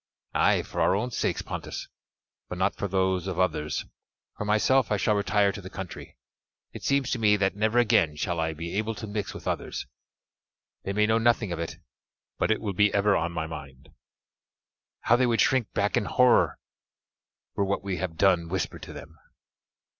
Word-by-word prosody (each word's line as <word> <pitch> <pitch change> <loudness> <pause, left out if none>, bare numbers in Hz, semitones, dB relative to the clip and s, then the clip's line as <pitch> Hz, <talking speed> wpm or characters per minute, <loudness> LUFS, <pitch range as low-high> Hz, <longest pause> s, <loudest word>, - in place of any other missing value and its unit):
"Ay, - - +3
for - - -4
our 95 - +3
own 120 +5 -2
sakes, - - -1
Pontus, - - -6 0.6
but 90 - -5
not 95 +2 +1
for 100 - -3
those 95 -1 0
of 95 -3 -3
others. 75 -5 0 0.5
For 105 - -4
myself 110 +4 +3
I 105 - +3
shall 105 - +2
retire 100 0 +2
to 100 - -8
the 95 - -9
country; 95 -8 -8 0.6
it - - -8
seems 140 -2 +1
to 125 - -1
me 105 -2 +4
that 95 -1 +1
never 110 +3 +1
again 110 -10 +3
shall 85 +3 -2
I 80 0 0
be 85 +3 -5
able 110 +1 -2
to 105 - -6
mix 105 -1 -4
with - - -8
others; - - -3 1.0
they 100 - -4
may 105 +2 +2
know 110 +1 +2
nothing 115 -4 +2
of 85 - -3
it, 85 - -4 0.6
but - - +1
it 110 - +1
will 100 -3 -2
be 105 +2 +3
ever 100 0 +3
on 85 +1 0
my 80 -2 -3
mind. 70 -4 -9 1.1
How 120 - +4
they 125 0 +3
would 115 -1 +1
shrink 130 -5 +2
back 100 0 +1
in - - +1
horror 125 +2 +4 1.0
were 100 - 0
what 100 0 -1
we 95 -2 -2
have 90 -3 -4
done 90 -3 +3
whispered 95 0 -3
to - - -9
them! 80 -2 -11
100 Hz, 190 wpm, -27 LUFS, 90-110 Hz, 1.1 s, me